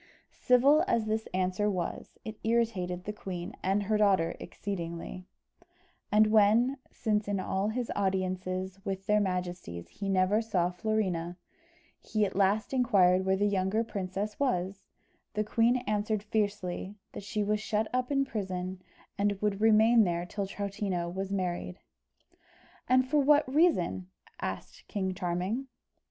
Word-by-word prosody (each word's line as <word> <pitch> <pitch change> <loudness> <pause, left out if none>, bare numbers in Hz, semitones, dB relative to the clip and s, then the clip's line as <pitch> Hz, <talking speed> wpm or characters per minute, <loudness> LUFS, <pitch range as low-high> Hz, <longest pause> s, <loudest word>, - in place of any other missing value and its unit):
Civil 275 +4 +5
as 230 -2 +1
this 220 +1 -1
answer 185 +3 0
was, 185 -4 -4
it 215 -1 -7
irritated 200 -6 0
the 210 - -4
queen 180 -4 -6
and 195 +2 +1
her 215 +2 +1
daughter 190 -5 +3
exceedingly; 180 -1 -6 0.8
and 210 +1 +6
when, 220 +5 +4
since 210 -2 -1
in 200 -1 0
all 190 +2 -1
his 235 +2 -2
audiences 185 -1 -2
with 195 0 -4
their 210 0 +3
majesties 180 - -3
he 200 -1 -5
never 195 +3 +3
saw 180 -6 0
Florina, 180 -3 -1 0.6
he 215 -2 0
at 195 - -5
last 200 +4 +2
inquired 190 -7 +4
where 190 - +4
the 205 +2 +1
younger 200 +2 +1
princess 200 -1 -4
was, 195 -7 -1 0.5
the 210 - +1
queen 230 +3 +3
answered 210 0 -1
fiercely, 205 -3 -2 0.2
that - - -7
she 205 +1 -2
was 210 +1 0
shut 215 0 -1
up 255 +1 0
in 275 -1 +2
prison, 185 -5 -4 0.4
and 200 -1 +1
would 210 -1 -1
remain 220 +1 +6
there 175 -2 -1
till 200 +2 -4
Troutina 200 -3 -3
was 190 +1 -4
married. 180 -2 -2 1.1
"And 255 0 +4
for 295 +3 +2
what 290 +1 +4
reason?" 260 - +2 0.3
asked - - -6
King 190 -3 -2
Charming. 185 +8 -2
200 Hz, 145 wpm, -30 LUFS, 185-220 Hz, 1.1 s, and